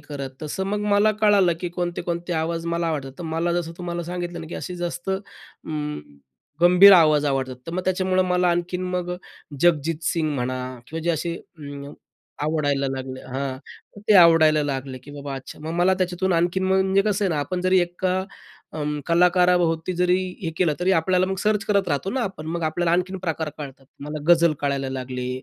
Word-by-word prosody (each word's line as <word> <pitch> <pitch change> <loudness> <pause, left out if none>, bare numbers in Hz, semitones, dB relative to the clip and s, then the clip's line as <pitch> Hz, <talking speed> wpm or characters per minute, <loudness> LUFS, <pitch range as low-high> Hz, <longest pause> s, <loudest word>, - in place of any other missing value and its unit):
करत, 145 -2 -6
तसं 170 +5 -3
मग 205 +1 -1
मला 210 +1 +4
कळालं 200 -5 +4
की 175 - -2
कोणते, 175 -1 -2
कोणते 175 0 -3
आवाज 165 +1 -2
मला 170 0 -1
आवडतात. 135 -4 -3
तर 175 - -6
मला 165 +2 -1
जसं 170 -1 -2
तुम्हाला 175 -1 -4
सांगितलं 175 -1 -5
ना, 160 - -8
की - - -7
असे 180 -1 -6
जास्त 175 +1 -4
अं, 155 -6 -6 0.6
गंभीर 180 +3 +8
आवाज 155 -4 +5
आवडतात, 130 -2 -1
तर 165 - -5
मग 185 - -1
त्याच्यामुळं 185 0 +1
मला 180 0 +2
आणखीन 175 +1 -2
मग 180 0 -2 0.5
जगजीत 165 -1 +2
सिंग 160 -3 0
म्हणा 130 0 -2 0.3
किंवा 165 +1 -5
जे 170 - +2
असे 170 +1 -2
अं, 145 -3 -10 0.5
आवडायला 145 -3 0
लागले 130 -1 -5
हां, 130 0 -3 0.5
ते 215 - +6
आवडायला 160 -3 +6
लागले 135 -2 -4
की 145 - -12
बाबा 140 -1 -6
अच्छा, 135 - -10
मग 160 - -4
मला 185 +2 +4
त्याच्यातून 185 0 -1
आणखीन 175 +2 +1
म्हणजे 190 +1 +3
कसं 205 -1 0
आहे 190 - +1
ना - - -1
आपण 180 +5 -3
जरी 185 0 +4
एका 180 +1 -1 0.5
अं, 150 -1 -3
कलाकाराभोवती 175 -1 +3
जरी 180 +1 +3 0.2
हे 165 - -2
केलं, 170 -5 +2
तरी 185 +2 +2
आपल्याला 185 +2 +2
मग 190 - -2
सर्च 210 -1 +1
करत 200 -2 +1
राहतो 145 +7 -1
ना 255 +2 -1
आपण. 185 -7 -5
मग 170 +1 -3
आपल्याला 170 +2 0
आणखीन 185 +2 0
प्रकार 160 -3 -3
कळतात. 135 -2 -9
मला 150 +2 -5
गझल 170 -2 +5
कळायला 140 -2 -1
लागले. 125 -1 -4
170 Hz, 185 wpm, -23 LUFS, 150-180 Hz, 0.6 s, गंभीर